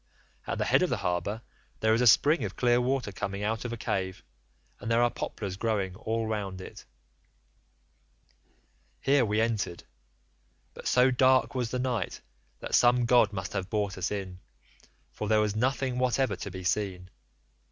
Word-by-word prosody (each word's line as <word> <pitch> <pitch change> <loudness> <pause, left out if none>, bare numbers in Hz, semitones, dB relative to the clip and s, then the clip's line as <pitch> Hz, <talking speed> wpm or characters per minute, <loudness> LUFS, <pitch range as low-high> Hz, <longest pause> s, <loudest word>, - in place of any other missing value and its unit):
At - - -2
the - - 0
head - - +3
of - - +2
the - - 0
harbour 90 +6 -1 0.4
there 110 0 +3
is 115 - +2
a 125 - +4
spring 145 +5 +5
of 100 -2 -4
clear 120 -1 +3
water 125 -3 -1
coming 100 +1 -4
out 110 +3 -2
of 120 - -3
a 120 - -4
cave, 95 -3 -3 0.6
and 110 - -6
there 115 +1 +3
are 120 - +2
poplars 95 -3 -5
growing 100 -4 -1
all 110 +4 -2
round 100 -4 -3
it. 95 - -10 2.1
"Here 140 -1 +3
we 105 -1 0
entered, 110 -6 -1 0.9
but - - -8
so 125 +1 +4
dark 130 +1 +3
was 125 -3 -1
the 125 - -2
night 125 -6 -2 0.4
that - - -6
some 120 0 +5
god 120 -3 +4
must 95 -2 -5
have 95 -2 -3
brought 100 -3 -1
us 90 -2 -2
in, 95 -3 -5 0.7
for 105 - -5
there 110 0 +4
was 105 -1 0
nothing 130 +2 0
whatever 125 -3 +1
to 95 - -6
be 95 0 -8
seen. 90 -1 -2
110 Hz, 175 wpm, -28 LUFS, 95-125 Hz, 2.1 s, spring